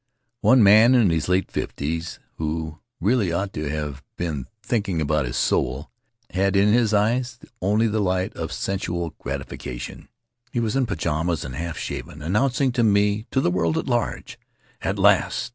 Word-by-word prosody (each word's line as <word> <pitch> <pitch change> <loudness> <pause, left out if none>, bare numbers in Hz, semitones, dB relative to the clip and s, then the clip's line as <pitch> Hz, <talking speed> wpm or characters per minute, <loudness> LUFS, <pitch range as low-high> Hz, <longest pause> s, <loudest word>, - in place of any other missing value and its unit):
One 130 -3 +5
man, 110 +5 +7
in 110 -8 +4
his 80 +1 -1
late 90 +1 +1
fifties, 80 +3 -3 0.2
who 80 0 -3 0.2
really 105 -1 +2
ought 95 +3 -2
to 75 -1 -3
have 75 -2 -4 0.2
been 75 -7 -3 0.2
thinking 105 -7 -1
about 75 -3 +1
his - - -3
soul, 65 +5 0 0.4
had 95 +1 +1
in 100 +2 +4
his 115 -2 +3
eyes 120 +4 +1 0.2
only 105 +4 +2
the 110 0 0
light 95 -2 0
of - - -4
sensual 85 -4 -3
gratification. - - -6 0.4
He 120 - -1
was 115 0 -1
in 135 -2 +2
pajamas 85 -5 -1
and 65 - -6
half 80 +3 -4
shaven, 75 - -6
announcing 130 - +1
to 120 -1 +1
me, 105 0 +2
to - - +1
the 90 - +2
world 85 -3 +1
at - - -1
large: - - -2 0.4
"At - - -1
last! - - +3
95 Hz, 165 wpm, -23 LUFS, 80-110 Hz, 0.4 s, man